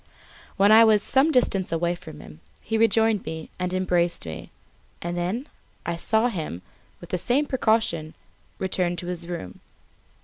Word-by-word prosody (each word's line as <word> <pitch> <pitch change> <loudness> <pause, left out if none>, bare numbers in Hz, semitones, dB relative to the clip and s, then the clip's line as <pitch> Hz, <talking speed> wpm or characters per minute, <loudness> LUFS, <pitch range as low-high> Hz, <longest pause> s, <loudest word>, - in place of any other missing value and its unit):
When 200 +2 +5
I 225 +1 +9
was 215 -2 +4
some 275 +4 +3
distance 205 -8 +1
from 165 - -3
him, 75 -1 -13 0.2
he 220 - -4
rejoined 225 -1 +3
me 160 0 -7
and 180 0 -1
embraced 175 - 0
me; 80 -1 -7 0.5
and 175 0 -4
then 190 - -2 0.4
I 170 - -1
saw 220 +7 +2
him, 155 - -5 0.4
with 175 - -12
the 180 - 0
same 260 - +1
precaution, 220 - 0 0.4
return 180 -2 -1
to 175 - -6
his 175 -1 -4
room. 170 - -6
180 Hz, 150 wpm, -25 LUFS, 170-220 Hz, 0.5 s, I